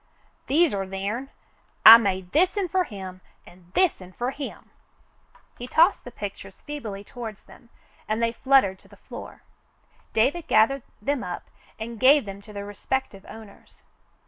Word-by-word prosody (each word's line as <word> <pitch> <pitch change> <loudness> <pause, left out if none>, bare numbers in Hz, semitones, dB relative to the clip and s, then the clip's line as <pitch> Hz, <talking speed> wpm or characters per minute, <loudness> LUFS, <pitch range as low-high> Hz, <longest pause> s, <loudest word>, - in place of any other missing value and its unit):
"These're 320 +4 +3 0.2
theirn. 200 +8 -4 0.6
I 225 +1 +13
made 190 -4 -2
this'n 370 - +2
fer 370 0 +1
him 190 - -9 0.2
an' 175 0 -18
this'n 190 - +1
fer 245 +5 -2
him." 280 0 -8 0.9
He 245 - -6
tossed 335 +9 +3
the - - -7
pictures 195 -2 -8
feebly 225 -10 -7
toward 225 -1 -8
them, 235 - -18 0.4
and 215 +1 -1
they 230 0 +1
fluttered 235 -6 +2
to - - -22
the - - -18
floor. - - -11 0.7
David 275 +10 +1
gathered 265 +5 +3 0.2
them 285 +2 -1
up 175 -1 -7 0.3
and 225 0 -6
gave 275 0 +5
them 200 0 -8
to 210 - -14
their 200 -1 -6
respective 205 0 -4
owners. 220 -3 -14
225 Hz, 145 wpm, -25 LUFS, 195-275 Hz, 0.9 s, I